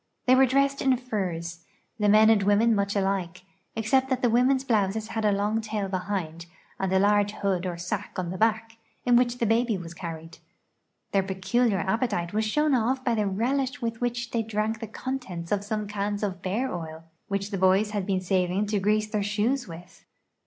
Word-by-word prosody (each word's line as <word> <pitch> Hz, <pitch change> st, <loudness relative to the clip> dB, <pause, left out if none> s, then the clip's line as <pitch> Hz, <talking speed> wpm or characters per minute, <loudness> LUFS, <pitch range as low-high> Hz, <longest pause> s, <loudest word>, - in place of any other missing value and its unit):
They 255 Hz, -, +5 dB
were 265 Hz, +1 st, +6 dB
dressed 275 Hz, +2 st, +1 dB
in 265 Hz, -2 st, +3 dB
furs, 175 Hz, -8 st, -4 dB, 0.4 s
the 210 Hz, -1 st, +3 dB
men 215 Hz, +1 st, +7 dB
and 215 Hz, -2 st, +4 dB
women 205 Hz, +4 st, +3 dB
much 200 Hz, -1 st, 0 dB
alike, 190 Hz, -3 st, -1 dB, 0.3 s
ex 220 Hz, -1 st, -3 dB
cept 265 Hz, 0 st, +3 dB
that 260 Hz, -1 st, -1 dB
the 240 Hz, -, +3 dB
women's 255 Hz, +3 st, +3 dB
blouses 215 Hz, -3 st, 0 dB
had 220 Hz, -, -3 dB
a 210 Hz, -, +4 dB
long 205 Hz, +3 st, 0 dB
tail 215 Hz, -3 st, -3 dB
behind 180 Hz, -3 st, -3 dB, 0.3 s
and 190 Hz, -1 st, -1 dB
a 190 Hz, -, +3 dB
large 205 Hz, +1 st, +3 dB
hood 190 Hz, -3 st, -1 dB
or 175 Hz, -1 st, -4 dB
sack 175 Hz, +1 st, -4 dB
on 180 Hz, -2 st, -2 dB
the 185 Hz, -, -5 dB
back, 225 Hz, +1 st, 0 dB, 0.3 s
in 245 Hz, -1 st, +4 dB
which 240 Hz, 0 st, +3 dB
the 235 Hz, -, 0 dB
baby 225 Hz, 0 st, +2 dB
was 170 Hz, -2 st, -8 dB
carried. 165 Hz, -2 st, -8 dB, 0.7 s
Their 195 Hz, -, +3 dB
peculiar 195 Hz, +4 st, 0 dB
appetite 190 Hz, -2 st, -1 dB
was 215 Hz, +1 st, +1 dB
shown 300 Hz, +7 st, +1 dB, 0.3 s
by 240 Hz, -, +1 dB
the 210 Hz, -2 st, 0 dB
relish 255 Hz, +7 st, -1 dB
with 230 Hz, -2 st, -4 dB
which 240 Hz, -1 st, -2 dB
they 230 Hz, -, 0 dB
drank 220 Hz, 0 st, -2 dB
the 225 Hz, -, -5 dB
contents 220 Hz, -8 st, -5 dB
of 205 Hz, -1 st, +1 dB
some 210 Hz, 0 st, -3 dB
cans 205 Hz, 0 st, -3 dB
of 190 Hz, -3 st, -2 dB
))ear 225 Hz, +8 st, -1 dB
oil 160 Hz, -2 st, -6 dB, 0.2 s
which 200 Hz, +1 st, -3 dB
the 195 Hz, -, -2 dB
boys 190 Hz, +3 st, +3 dB
had 205 Hz, -3 st, -2 dB
been 190 Hz, -2 st, 0 dB
saving 185 Hz, +2 st, 0 dB
to 205 Hz, 0 st, 0 dB
grease 210 Hz, +2 st, +2 dB
their 210 Hz, -1 st, -1 dB
shoes 215 Hz, +6 st, 0 dB
w'ith. 175 Hz, +2 st, -12 dB
210 Hz, 200 wpm, -26 LUFS, 190-230 Hz, 0.7 s, men